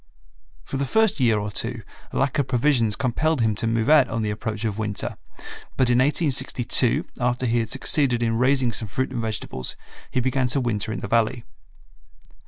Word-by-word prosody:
For 135 - -5
the 140 - -1
first 220 +6 +2
year 115 -4 +3
or 105 0 -3
two 115 +2 -3 0.3
lack 135 +2 0
of 140 - 0
provisions 120 -4 +2
compelled 150 +5 0
him 110 -2 +2
to 115 - -2
move 115 0 0
out 145 -4 +5
on 115 -1 -2
the 105 - -1
approach 110 0 -4
of 110 -1 -2
winter, 105 -2 -2 0.6
but 125 -2 +2
in 120 - +3
1862 130 -4 +2
after 125 +1 0
he 120 0 +1
had 115 -2 -2
succeeded 130 -2 +1
in 115 -1 0
raising 130 -1 +2
some 110 -1 -5
fruit 130 +7 -2
and 120 -3 -3
vegetables 105 - -2 0.3
he - - -1
began 130 0 0
to 135 +3 +1
winter 110 -4 -2
in - - -4
the - - -4
Valley. 115 +2 +1
120 Hz, 190 wpm, -23 LUFS, 110-130 Hz, 0.6 s, out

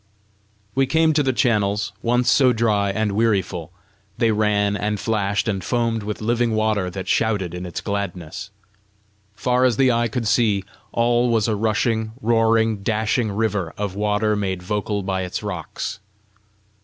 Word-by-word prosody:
We 135 0 +2
came 160 +2 +3
to 150 - +3
the 135 -2 +2
channels, 105 -4 +1
once 120 +1 +1
so 130 -1 +5
dry 105 -3 +1
and 105 +1 0
wearyful: 95 -6 0 0.5
they 115 -1 +2
ran 105 -1 +1
and 105 0 -2
flashed 100 -2 0
and 95 -4 -1
foamed 115 0 0
with 105 +1 -5
living 120 0 +1
water 110 -4 +1
that 95 +1 -6
shouted 105 -6 0
in 90 0 -5
its 85 - -5
gladness! 95 -5 -4 0.9
Far 125 +4 +1
as 125 -4 +3
the 130 -2 +4
eye 120 0 +1
could 115 0 -3
see, 105 -4 +2 0.3
all 120 +1 +2
was 115 -2 +2
a 110 - +1
rushing, 110 +1 0
roaring, 115 -2 +2
dashing 110 +2 0
river 105 -5 -1
of 100 -2 -3
water 105 +1 +1
made 95 -3 -2
vocal 105 +1 -2
by 95 0 -1
its 90 +3 -4
rocks. 90 -6 -5
105 Hz, 155 wpm, -22 LUFS, 100-115 Hz, 0.9 s, so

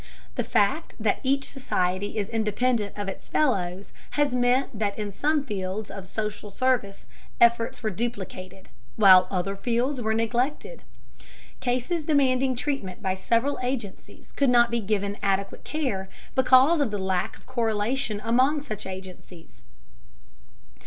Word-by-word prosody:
The - - -1
fact 270 +11 +1
that 215 -2 +1
each 275 +1 +1
society 200 -5 -2
is 205 -2 -1
independent 220 -1 0
of 205 -1 -3
its 195 - -7
fellows 195 -10 0 0.3
has 290 -3 +2
meant 245 -2 +1
that 205 -2 -1
in 210 -1 -3
some 295 +8 +1
fields 205 -3 -4
of 195 -2 -8
social 210 0 -4
service 225 -3 -1 0.3
efforts 235 0 +3
were 215 - 0
duplicated, 195 -3 -5 0.3
while 190 -3 +7
other 195 +1 -2
fields 245 +5 -1
were 220 -1 0
neglected. 245 - -1 0.8
Cases 255 +7 -1
demanding 265 -3 +2
treatment 245 -8 -3
by 190 -1 +1
several 230 +9 0
agencies 245 -6 -5
could 280 -2 +1
not 240 -1 +5
be 235 - +1
given 200 -1 -2
adequate 195 -1 -1
care 230 -12 -2 0.2
because 260 +5 +5
of 275 - +1
the 205 - -3
lack 190 -2 -1
of - - -23
correlation 230 -1 -1
among 260 +6 +3
such 215 -7 -6
agencies. 180 - -10
225 Hz, 140 wpm, -26 LUFS, 195-255 Hz, 0.8 s, while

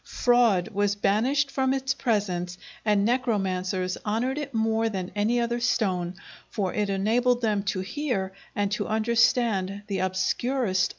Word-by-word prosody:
Fraud 235 -7 +2
was 205 -1 0
banished 250 +8 +1
from 265 0 +1
its 265 0 -1
presence 185 -7 -1 0.3
and 210 -2 +2
necromancers 190 -6 0
honored 240 +6 -1
it 285 -2 -5
more 225 -1 +1
than 190 -3 -4
any 220 +4 +1
other 235 0 0
stone, 190 -7 0 0.4
for 195 -5 -2
it 210 -1 0
enabled 235 +6 +2
them 210 -3 +1
to 195 -1 -2
hear 195 -3 -2 0.2
and 200 -1 0
to 210 - -1
understand 220 -3 +1
the 195 -2 -3
obscurest 195 +7 0
oracles. 185 -1 +2
215 Hz, 145 wpm, -26 LUFS, 195-240 Hz, 0.4 s, Fraud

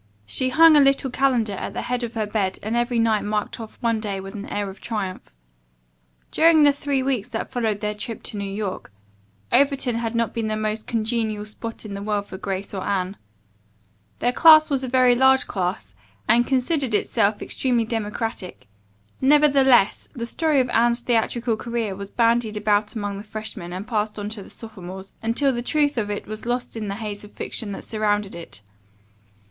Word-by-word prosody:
She 255 - 0
hung 320 +4 +7
a - - +7
little 275 -1 +3
calendar 250 -5 +1
at - - -5
the - - -3
head 250 0 -2
of 235 0 -4
her 220 -1 0
bed 205 -3 -1
and 220 +3 -2
every 240 0 0
night 225 -2 +2
marked 210 +2 -2
off 225 -1 -9
one 230 -2 +1
day 205 -3 -3
with 195 +1 -8
an 205 -1 -7
air 205 0 -2
of 195 0 -10
triumph. 200 -5 -4 1.0
During 320 -1 +5
the 290 - +7
three 280 -2 -1
weeks 260 -6 -1
that 225 - -4
followed 225 -5 -1
their 210 -1 -1
trip 215 +2 -6
to 210 - -6
New 200 -1 -4
York, 195 - -4 0.6
Overton 275 -3 +2
had 230 0 -3
not 230 0 0
been 225 -1 -2
the 215 0 -1
most 215 0 -3
congenial 220 -2 -1
spot 225 +1 -7
in 205 - -6
the 200 - -5
world 205 -1 -1
for 190 - -9
Grace 195 0 -4
or 190 - -3
Anne. 195 -1 -1 1.1
19 310 +6 +8
was 270 -1 +1
a - - -2
very 255 0 +4
large 265 +1 +4
class, 180 - -3 0.3
and 240 +1 +4
considered 265 -2 +1
itself 205 0 +1
extremely 245 -3 0
democratic; 220 -3 -4 0.6
nevertheless, 270 -5 +4
the 235 -5 -4
story 305 +4 +1
of 255 -1 +1
Anne's 235 +1 +3
theatrical 235 0 0
career 230 -3 -3
was 200 0 -7
bandied 230 -2 +1
about 210 +1 +1
among 205 -2 -3
the - - -8
freshmen 215 -4 -6
and 185 +4 -6
passed 215 -2 -1
on 205 0 -4
to 215 -1 -7
the - - -12
sophomores, 190 -3 -8
until 250 +5 +1
the 240 - -2
truth 290 +3 +1
of 215 -4 -1
it 205 - -4
was 215 +2 -6
lost 245 0 -2
in 220 -2 -4
the 200 - -3
haze 210 -1 -5
of 210 - -12
fiction 215 -4 -5
that 195 - -6
surrounded 210 -2 -1
it. 165 - -10
225 Hz, 190 wpm, -23 LUFS, 205-245 Hz, 1.1 s, 19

